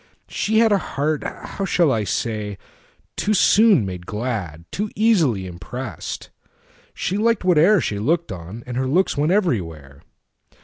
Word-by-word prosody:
She 220 +1 -1
hadA 220 -3 +4
heart—how 155 +6 -3
shall 170 -6 +2
I 110 -4 0
say?—too 105 - -4
soon 200 - +5
made 90 -2 -7
glad. 105 -8 -4
Too 210 +2 -2
easily 165 - +2
impressed: 95 +3 -7 0.6
she 190 - -2
liked 230 0 +1
whate'erShe 170 - +3
looked 170 +2 0
on, 95 +6 -8
and 125 -1 -5
her 130 0 0
looks 180 +8 +2
went 150 +4 +1
everywhere. 80 - -1
130 Hz, 125 wpm, -21 LUFS, -, 0.6 s, soon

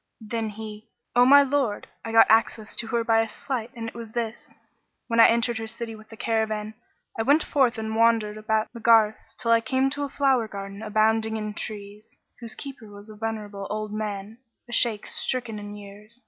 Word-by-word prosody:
Then 225 0 -3
he, 215 +1 -9 0.3
"O 245 0 +7
my 285 +1 +8
lord, 270 -6 -1 0.2
I 225 - -5
got 225 - +7
me 220 - +8
access 220 -1 -2
to 235 - -1
her 230 +1 0
by 225 0 +4
a 225 - -2
sleight 240 0 -4
and 230 -1 -5
it - - -7
was 230 -2 -9
this. 235 -1 -4 0.5
When 230 -1 0
I 225 - +10
entered 235 0 +1
her 225 - -5
city 230 0 -5
with 215 0 -14
the 225 - -12
caravan, 220 -1 -1 0.5
I - - +3
went 285 +7 +4
forth 255 -4 +2
and 220 0 -3
wandered 225 -2 +3
about 215 +1 -1
the 235 - -8
garths 220 -1 +3
till 230 - -1
I 230 0 +5
came 260 +4 +1
to 290 0 -3
a 285 - -3
flower 265 -5 +2
garden 200 0 -7
abounding 220 +1 +1
in 210 -1 -4
trees, 210 0 -8 0.2
whose 230 -2 -7
keeper 270 -5 -8
was 205 +1 -12
a 215 - -10
venerable 210 -2 -5
old 215 0 -3
man, 210 +1 -5 0.3
a 240 - -8
Shaykh 230 -3 +2
stricken 240 -4 -3
in 205 0 -8
years. 210 +3 -12
225 Hz, 205 wpm, -25 LUFS, 215-235 Hz, 0.5 s, I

